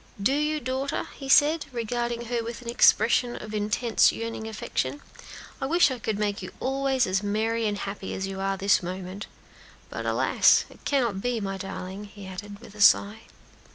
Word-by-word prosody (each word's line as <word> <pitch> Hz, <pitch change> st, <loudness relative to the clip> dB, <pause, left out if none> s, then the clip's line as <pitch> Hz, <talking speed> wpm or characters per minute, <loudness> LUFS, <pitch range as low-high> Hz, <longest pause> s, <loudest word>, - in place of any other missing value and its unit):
"Do 215 Hz, +7 st, +2 dB
you, 300 Hz, +1 st, 0 dB
daughter?" 265 Hz, +2 st, -3 dB
he 270 Hz, -1 st, -8 dB
said, 300 Hz, +4 st, +5 dB
regarding 235 Hz, 0 st, -2 dB
her 235 Hz, 0 st, -2 dB
with 235 Hz, +2 st, -7 dB
an -, -, -11 dB
expression 240 Hz, 0 st, +4 dB
of 215 Hz, 0 st, -8 dB
intense 215 Hz, +2 st, +2 dB
yearning 230 Hz, -1 st, -5 dB
affection; 145 Hz, -10 st, -3 dB, 0.6 s
"I 270 Hz, -, -1 dB
wish 335 Hz, -1 st, +4 dB
I 255 Hz, -, -4 dB
could 220 Hz, -2 st, -2 dB
make 205 Hz, -1 st, -1 dB
you 185 Hz, -, -7 dB
always 270 Hz, -1 st, +1 dB
as 190 Hz, +1 st, 0 dB
gay 220 Hz, +2 st, 0 dB
and 205 Hz, -1 st, -1 dB
happy 195 Hz, -1 st, -5 dB
as 190 Hz, -, -3 dB
you 195 Hz, 0 st, -5 dB
are 195 Hz, 0 st, 0 dB
at 195 Hz, -, -7 dB
this 200 Hz, 0 st, +4 dB
moment. 185 Hz, +2 st, -6 dB, 0.6 s
But -, -, -4 dB
alas! -, -, +4 dB
it -, -, -18 dB
cannot 235 Hz, -9 st, 0 dB
be, 245 Hz, 0 st, -1 dB
my 195 Hz, -2 st, -3 dB
darling," 195 Hz, +1 st, -6 dB
he 205 Hz, -1 st, -12 dB
added 200 Hz, +2 st, -8 dB
with 215 Hz, -, -13 dB
a 210 Hz, -, -8 dB
sigh. 205 Hz, +1 st, +5 dB
220 Hz, 190 wpm, -26 LUFS, 200-245 Hz, 0.6 s, said